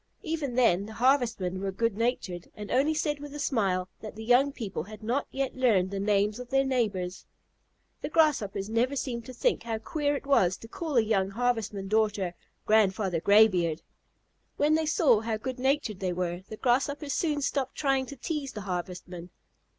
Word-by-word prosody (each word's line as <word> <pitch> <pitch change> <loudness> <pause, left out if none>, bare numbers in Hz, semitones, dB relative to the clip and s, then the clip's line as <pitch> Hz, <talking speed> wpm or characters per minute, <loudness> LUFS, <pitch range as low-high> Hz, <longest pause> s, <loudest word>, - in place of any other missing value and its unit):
Even 310 -6 -3
then 205 -6 +3
the 220 - -9
Harvestmen 230 -7 +1
were 195 0 -2
good 230 +2 0
natured, 205 -7 -2
and 210 -1 -7
only 285 +5 +2
said 300 -1 -1
with 290 0 -8
a - - -6
smile 195 -10 0
that 215 -2 -8
the 220 - -7
young 255 +4 +4
people 215 - -5
had 210 +5 -10
not 245 +6 -1
yet 270 -1 -3
learned 210 -8 +2
the 200 - -3
names 205 +2 +1
of 250 -1 -8
their 270 0 +3
neighbors. 205 -9 -1 0.7
The - - -3
Grasshoppers 270 -12 +2
never 235 +5 +1
seemed 240 -4 -3
to 255 - -8
think 480 - +1
how 230 -1 -3
queer 290 +5 -1
it 280 - -6
was 190 -10 +3
to 225 - -11
call 305 +2 -3
a - - +7
young 195 -3 +1
Harvestman 220 -3 -1
daughter 210 -4 +1 0.3
"Grandfather 195 -4 +2
Graybeard." 185 -6 +4 0.7
When 295 +1 +3
they 315 0 +1
saw 285 -8 +4
how 220 0 -2
good 255 +3 -5
natured 265 -6 0
they 185 -2 -1
were, 175 0 -2
the 215 - -7
Grasshoppers 280 +4 0
soon 300 -4 0
stopped 270 -1 -1
trying 270 -3 +1
to 280 - -8
tease 285 -1 -4
the 210 - -6
Harvestmen. 180 -1 -5
225 Hz, 185 wpm, -28 LUFS, 195-270 Hz, 0.7 s, a